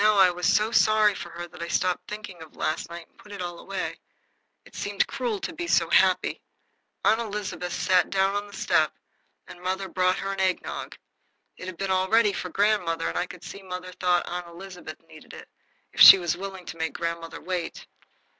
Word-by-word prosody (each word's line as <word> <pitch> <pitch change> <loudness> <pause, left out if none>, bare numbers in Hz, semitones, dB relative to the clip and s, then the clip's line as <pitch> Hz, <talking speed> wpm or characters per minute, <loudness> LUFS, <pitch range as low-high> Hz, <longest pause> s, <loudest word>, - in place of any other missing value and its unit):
Now 215 -1 +5
I 190 -2 +6
was 180 0 +1
so 215 +2 +2
sorry 215 -2 +4
for 175 - -7
her 175 0 -7
that 180 -1 -12
I 170 - -3
stopped 180 +1 0
thinking 205 -5 -8
of 160 - -13
last 155 +1 -2
night 170 0 -9
and - - -34
put 210 - -15
it 200 - -8
all 175 -1 -5
away. - - -5 0.7
It - - -18
seemed 205 -1 -1
cruel 245 -6 -3
to 335 - -4
be 340 +1 -5
so - - +2
happy. - - +3 0.6
Aunt 220 +2 +4
Elizabeth 205 -5 -4
sat 185 -2 +2
down 195 0 +1
on 205 0 -2
the 205 - -15
step - - +2 0.5
and 175 - -13
mother 190 +1 -2
brought 185 0 +1
her 195 0 -3
an 195 - -6
eggnog. 190 -1 -2 0.6
It 185 - -9
had 185 -2 -7
been 195 +1 -2
all 185 0 +1
ready 225 -2 +4
for 180 - -4
grandmother, 180 -4 +1
and - - -6
I 180 - -1
could 180 - -12
see 200 - -9
mother 185 -1 -7
thought 180 -1 +2
Aunt 175 0 -5
Elizabeth 175 -2 -10
needed 155 -1 -14
it, - - -11 0.5
if - - -2
she - - +13
was 175 -3 -1
willing 190 -1 -7
to 165 - -8
make 160 -1 -2
grandmother 170 -1 -4
wait. 180 -2 -4
185 Hz, 210 wpm, -26 LUFS, 175-205 Hz, 0.7 s, she